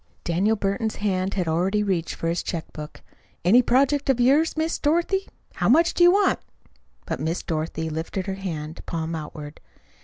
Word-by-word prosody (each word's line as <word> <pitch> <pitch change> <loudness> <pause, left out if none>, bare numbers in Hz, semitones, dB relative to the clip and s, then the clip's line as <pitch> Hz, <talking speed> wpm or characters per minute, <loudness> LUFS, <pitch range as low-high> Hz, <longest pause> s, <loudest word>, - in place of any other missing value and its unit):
Daniel 190 +6 +1
Burton's 210 +2 -1
hand 195 -2 -1
had 180 -4 -1
already 185 +6 +1
reached 185 -5 -1
for 165 - -3
his 170 +1 0
check 165 -2 -5
book. 150 -1 -9 0.4
"Any 225 +8 +7
project 275 +4 +2
of 260 -2 +3
yours, 285 +7 +3
Miss 320 +1 -1
Dorothy! 345 +6 +1 0.3
How - - 0
much 330 +7 +5
do 350 - +3
you 350 - +9
want?" 405 +2 +3 0.7
But - - -3
Miss 165 +3 -2
Dorothy 160 0 -3
lifted 160 +4 -4
her 195 - -3
hand, 165 -5 -6
palm 165 0 -3
outward. 150 -1 -7
195 Hz, 175 wpm, -24 LUFS, 165-260 Hz, 0.7 s, you